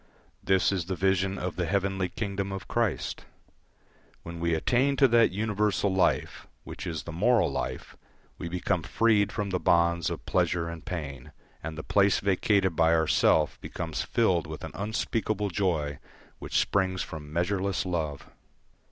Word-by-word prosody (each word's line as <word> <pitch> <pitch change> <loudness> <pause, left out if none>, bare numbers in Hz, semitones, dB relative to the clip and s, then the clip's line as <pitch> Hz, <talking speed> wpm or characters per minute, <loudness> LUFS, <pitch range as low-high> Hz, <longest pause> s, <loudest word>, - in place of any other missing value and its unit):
This 95 -1 +3
is 95 -4 -1
the 95 +1 -3
vision 95 +1 +1
of 90 -1 -4
the 90 -2 -1
heavenly 95 0 0
kingdom 100 0 -3
of 95 -1 -6
Christ. 115 -4 -1 1.0
When 85 0 -7
we 85 -1 +1
attain 130 - +2
to 135 0 +5
that 115 0 +5
universal 105 0 0
life, 95 - 0 0.2
which - - -7
is 80 -4 -4
the 85 - -7
moral 110 +8 +3
life, - - -4 0.4
we 85 - -4
become 90 0 -1
freed 105 +3 +2
from 105 -3 -3
the 90 - 0
bonds 85 -2 +2
of - - -6
pleasure 85 -1 +1
and 85 -1 -8
pain, 75 -8 -6 0.3
and 80 +1 -6
the 80 - -5
place 100 -1 +3
vacated 100 -2 +2
by 80 +1 +4
our 80 -1 +2
self 75 -1 +2
becomes 80 -2 -4
filled 90 -8 +1
with 80 0 -8
an - - -6
unspeakable 105 -1 -2
joy 80 -7 -1 0.4
which - - -2
springs 95 -2 +1
from 75 -2 -8
measureless 95 +3 0
love. 80 -6 -3
95 Hz, 160 wpm, -28 LUFS, 85-100 Hz, 1.0 s, to